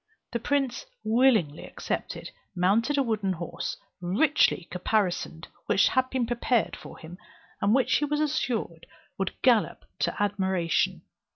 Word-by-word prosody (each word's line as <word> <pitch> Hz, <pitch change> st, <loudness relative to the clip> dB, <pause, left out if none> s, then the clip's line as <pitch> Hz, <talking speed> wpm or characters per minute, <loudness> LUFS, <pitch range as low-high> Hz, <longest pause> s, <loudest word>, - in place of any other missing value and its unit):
The 235 Hz, -, -1 dB
prince 280 Hz, -, -1 dB, 0.2 s
willingly 220 Hz, -, +3 dB
accepted, -, -, -5 dB, 0.2 s
mounted 210 Hz, +10 st, +2 dB
a 275 Hz, -, +4 dB
wooden 210 Hz, -5 st, 0 dB
horse, 170 Hz, -1 st, -5 dB, 0.2 s
richly 195 Hz, -, +2 dB
caparisoned, 180 Hz, -3 st, -1 dB, 0.2 s
which 200 Hz, -, +4 dB
had 260 Hz, 0 st, +1 dB
been 260 Hz, -2 st, 0 dB
prepared 240 Hz, -1 st, 0 dB
for -, -, -11 dB
him, 170 Hz, +3 st, -11 dB, 0.4 s
and 205 Hz, +3 st, +3 dB
which 255 Hz, -2 st, +3 dB
he 295 Hz, -, 0 dB
was 295 Hz, +1 st, -1 dB
assured 245 Hz, -, -1 dB, 0.3 s
would 195 Hz, -, -3 dB
gallop 240 Hz, -4 st, +3 dB
to -, -, 0 dB
admiration. 190 Hz, -4 st, 0 dB
220 Hz, 130 wpm, -27 LUFS, 185-260 Hz, 0.4 s, a